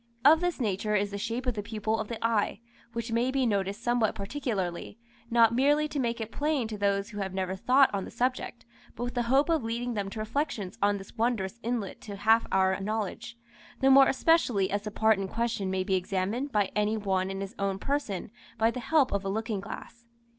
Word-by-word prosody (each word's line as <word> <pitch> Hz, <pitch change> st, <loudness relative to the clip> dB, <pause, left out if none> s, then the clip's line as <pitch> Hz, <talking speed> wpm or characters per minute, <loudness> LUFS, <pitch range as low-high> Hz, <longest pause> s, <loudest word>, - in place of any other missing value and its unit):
Of 315 Hz, +3 st, +7 dB
this 355 Hz, -3 st, -1 dB
nature 210 Hz, -2 st, 0 dB
is 205 Hz, 0 st, +1 dB
the 200 Hz, -, -4 dB
shape 230 Hz, +4 st, -3 dB
of 250 Hz, -, 0 dB
the 210 Hz, -, -3 dB
pupil 215 Hz, +1 st, -2 dB
of -, -, -3 dB
the 230 Hz, -, -4 dB
eye, 220 Hz, -2 st, +1 dB, 0.3 s
which 230 Hz, 0 st, -4 dB
may 235 Hz, +2 st, +1 dB
be 265 Hz, -1 st, +1 dB
noticed 200 Hz, 0 st, -1 dB
somewhat 240 Hz, -3 st, +1 dB
particularly, 200 Hz, -5 st, -3 dB, 0.3 s
not 230 Hz, -1 st, +5 dB
merely 290 Hz, +5 st, +3 dB
to 290 Hz, -, -3 dB
make 235 Hz, -2 st, -1 dB
it 225 Hz, 0 st, -5 dB
plain 290 Hz, -5 st, 0 dB
to 215 Hz, -, -5 dB
those 200 Hz, 0 st, +1 dB
who 205 Hz, -, -6 dB
have 190 Hz, -1 st, -3 dB
never 190 Hz, 0 st, -1 dB
thought 260 Hz, +7 st, +4 dB
on 195 Hz, -1 st, -1 dB
the -, -, -7 dB
subject, 250 Hz, 0 st, -2 dB, 0.3 s
but -, -, -4 dB
with 245 Hz, -, -3 dB
the 245 Hz, -, 0 dB
hope 275 Hz, +3 st, +4 dB
of 325 Hz, -6 st, +1 dB
leading 235 Hz, +2 st, -2 dB
them 200 Hz, -3 st, -2 dB
to 210 Hz, -, -9 dB
reflections 220 Hz, -3 st, -2 dB
on 205 Hz, 0 st, +3 dB
this 195 Hz, +2 st, -12 dB
wondrous 225 Hz, -2 st, -1 dB
inlet 230 Hz, -4 st, -3 dB
to 205 Hz, -2 st, -7 dB
half 220 Hz, +3 st, +3 dB
our 190 Hz, 0 st, +2 dB
knowledge, 220 Hz, +3 st, -4 dB, 0.4 s
the 270 Hz, 0 st, +4 dB
more 270 Hz, 0 st, +8 dB
especially 255 Hz, -, +2 dB
as 205 Hz, +1 st, 0 dB
the 210 Hz, -, -5 dB
part 220 Hz, 0 st, +3 dB
in 195 Hz, -, -2 dB
question 225 Hz, -2 st, -2 dB
may 185 Hz, 0 st, 0 dB
be 190 Hz, -, -1 dB
examined 195 Hz, +8 st, -1 dB
by 205 Hz, -4 st, +1 dB
any 210 Hz, +1 st, +1 dB
one 190 Hz, -2 st, 0 dB
in 195 Hz, 0 st, -4 dB
his 195 Hz, 0 st, -5 dB
own 195 Hz, -1 st, 0 dB
person 215 Hz, -6 st, -3 dB, 0.3 s
by 225 Hz, +1 st, +3 dB
the 250 Hz, -, -5 dB
help 280 Hz, +2 st, +2 dB
of 200 Hz, -1 st, -1 dB
a 195 Hz, -, -2 dB
looking 220 Hz, 0 st, -2 dB
glass. 235 Hz, +4 st, -9 dB
220 Hz, 220 wpm, -28 LUFS, 200-245 Hz, 0.4 s, more